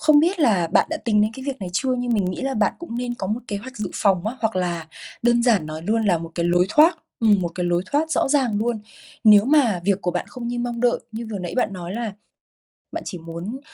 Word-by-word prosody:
không 305 -1 +6
biết 350 +2 +1
là 200 - +3
bạn - - +4
đã 320 - -1
tính 210 -3 +3
đến 215 - +1
cái 265 - -8
việc 275 -2 -3
này 185 - -4
chưa 255 +7 +1
nhưng 245 -1 -1
mình 205 -4 +2
nghĩ 185 0 -3
là 270 0 -1
bạn 215 -3 +2
cũng 330 -9 -7
nên 245 -1 -2
có 195 - -4
một 220 +5 -2
kế 205 - -2
hoạch 255 +5 -9
dự 205 -4 -4
phòng 195 -2 +2
á, 240 - -3
hoặc 220 -3 0
là 175 -3 -2 0.4
đơn 240 0 +3
giản 220 -10 +3
nói 155 +1 -6
luôn 225 +5 +1
là 175 -4 +3
một 165 0 -7
cái 170 -1 0
lối 175 +1 +3
thoát 320 - +5 0.2
ừm, 210 -4 +4
một 170 - 0
cái 180 - -2
lối 175 0 +1
thoát 315 +2 +1
rõ 280 - +1
ràng 260 -7 +2
luôn. 230 0 -1 0.4
Nếu 210 -2 +8
mà 255 - +3
việc 200 -1 +2
của 180 - 0
bạn 180 0 -3
không 240 -2 -6
như 245 - -3
mong 240 -1 -3
đợi 245 0 +3
như 225 +1 -5
vừa 205 - -3
nãy 175 -2 -5
bạn 245 - +1
nói 180 -1 -6
là 230 -3 -3 0.8
bạn - - -5
chỉ 180 - -5
muốn, 170 +9 -6
220 Hz, 270 wpm, -22 LUFS, 185-245 Hz, 0.8 s, Nếu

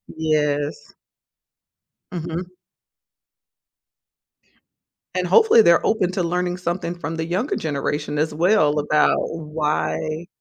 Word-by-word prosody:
Yes. 150 -2 -1 1.2
Mhm. 175 +1 -5 2.6
And - - 0
hopefully 445 - +6
they're 170 -4 +4
open 190 -5 +1
to 185 - -1
learning 180 +1 -1
something 175 -1 -3
from 165 -1 -5
the 160 0 -3
younger 185 - -1
generation 150 0 -3
as 155 +1 0
well 160 -2 +3
about 150 +1 +2
why 155 +1 -2
165 Hz, 100 wpm, -22 LUFS, 150-180 Hz, 2.6 s, hopefully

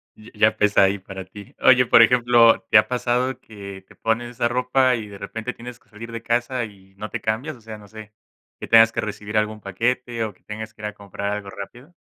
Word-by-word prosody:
Y 110 +1 -16
ya 110 0 +3
pesa 105 -2 +4
ahí 95 +1 +2
para 95 0 -8
ti. 100 +2 -14
Oye, 125 -1 +6
por 115 - +6
ejemplo, 120 -1 +5
¿te - - +7
ha 105 - +4
pasado 125 +1 -1
que 100 -3 -11
te - - -19
pones 120 +2 -2
esa 120 -1 -1
ropa, 125 +1 +2
y 110 -3 -6
de 100 -1 -11
repente 110 +5 -6
tienes 120 0 -10
que - - -33
salir 115 +2 -10
de 115 0 -6
casa 120 +1 -1
y 95 -2 -17
no 105 +2 -7
te - - -5
cambias, 125 +7 -2
o 120 - -18
sea, 110 -1 -9
no 105 -1 -15
sé, 110 0 -12 0.5
que - - -7
tengas 115 0 +7
que - - -4
recibir 105 0 -4
algún 110 0 -1
paquete, 115 +4 -2
o 105 - -7
que - - -33
tengas 110 +1 -7
que 105 - -16
ir - - -5
a 105 - -6
comprar 100 0 -5
algo 105 -1 -5
rápido? 120 - -10
110 Hz, 240 wpm, -22 LUFS, 105-120 Hz, 0.5 s, te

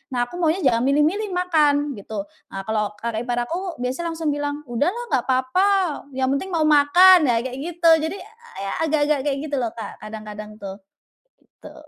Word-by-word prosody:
Nah 245 - +2
aku 350 - -9
maunya 340 +2 +1
jangan 245 -4 +3
milih-milih 305 +10 +2
makan, 300 -5 +2
gitu. 200 0 -5 0.3
Nah 195 - -5
kalau 210 0 -1
kakak 230 +1 -4
ipar 245 - 0
aku 350 +6 -4
biasanya 330 +7 -2
langsung 320 -2 -2
bilang, 290 0 -3
"Udahlah 350 - -1
nggak 250 - +2
apa-apa, 260 +10 +2 0.5
yang 265 0 0
penting 370 +6 -4
mau 320 - +2
makan." 310 +4 +6
nah 240 - +3
kayak 260 0 -5
gitu, 335 +2 +1
jadi 320 +5 -3 0.5
ya 195 - -3 0.2
agak-agak 295 -1 +1
kayak 275 -1 0
gitu - - 0
loh 230 -3 -2
Kak, 225 - -7
kadang-kadang 215 0 -9
tuh. 195 -2 -8 0.6
Gitu. - - -16
290 Hz, 175 wpm, -22 LUFS, 235-330 Hz, 0.6 s, makan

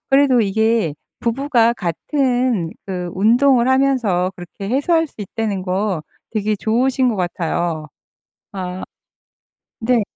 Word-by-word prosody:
그래도 270 -3 +5
이게 220 -4 +1 0.3
부부가 235 -1 +2
같은 245 - 0 0.2
그 180 -2 -4
운동을 240 +5 +4
하면서 250 -9 +2
그렇게 180 +3 -8
해소할 325 +6 +2
수 - - -26
있다는 205 -1 -3
거 185 -2 -1 0.3
되게 215 -1 0
좋으신 250 +5 +1
것 225 - -1
같아요. 170 -3 -2 0.7
아. 185 -1 -5 1.0
네. 235 0 +2
220 Hz, 230 characters per minute, -19 LUFS, 185-255 Hz, 1.0 s, 그래도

